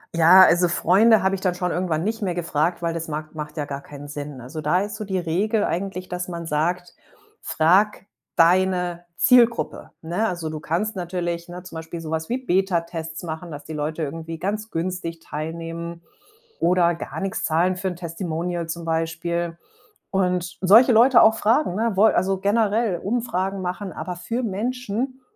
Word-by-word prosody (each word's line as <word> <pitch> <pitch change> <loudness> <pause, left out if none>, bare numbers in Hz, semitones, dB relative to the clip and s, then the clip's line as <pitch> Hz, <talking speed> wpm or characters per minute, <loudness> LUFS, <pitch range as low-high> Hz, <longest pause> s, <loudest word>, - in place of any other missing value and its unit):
Ja, 170 +3 +8
also 175 +1 +5
Freunde 195 +5 +4
habe 190 0 +2
ich 190 - -7
dann 180 -2 0
schon 180 0 -1
irgendwann 170 -3 -1
nicht 220 +2 -2
mehr 180 -3 -1
gefragt, 170 0 -1
weil 165 -1 -1
das 165 -1 -4
mag 155 +1 -5
macht 150 0 -7
ja 150 - -2
gar 140 -1 -5
keinen 145 0 -11
Sinn. 145 -3 -7
Also, 150 +6 -7
da 155 +5 +2
ist 205 0 -4
so 215 -1 -6
die 190 -1 -2
Regel 200 +6 0
eigentlich, 185 0 -3
dass 180 0 -4
man 170 -2 -6
sagt: 175 +4 -1 0.4
„Frag 195 +6 +2 0.3
deine 180 0 +2
Zielgruppe“, 240 -2 +3
ne? 175 +7 -1
Also, 170 -4 -3
du 155 -1 -5
kannst 190 +8 -2
natürlich, 175 -1 -3
ne, 180 +1 -8
zum 165 -3 -9
Beispiel 165 +1 -7
so 160 - -7
was 160 0 -2
wie 245 - -1
Betatests 170 -6 -1
machen, 160 +1 -6
dass 145 0 -8
die 160 - -10
Leute 155 +2 -3
irgendwie 165 +2 -5
ganz 210 +5 -3
günstig 165 -1 -4
teilnehmen 165 +2 -6 0.6
oder 175 0 +3
gar 170 - -6
nix 195 -1 -2
zahlen 175 +3 +1
für 190 +1 -3
'n 180 - -3
Testimonial 170 0 -4
zum 170 +1 -5
Beispiel. 165 +1 -2 0.5
Und 180 -2 -1
solche 225 +7 +7
Leute 235 +2 +6
auch 220 0 +6
fragen, 225 -1 +2
ne, 225 +1 0
wol 215 +3 +5
also 190 +1 +1
generell 210 -1 +1
Umfragen 200 -3 -2
machen, 185 +1 -4
aber 180 -1 -5
für 230 +8 -3
Menschen, 245 +4 -3
175 Hz, 180 wpm, -23 LUFS, 165-195 Hz, 0.6 s, Ja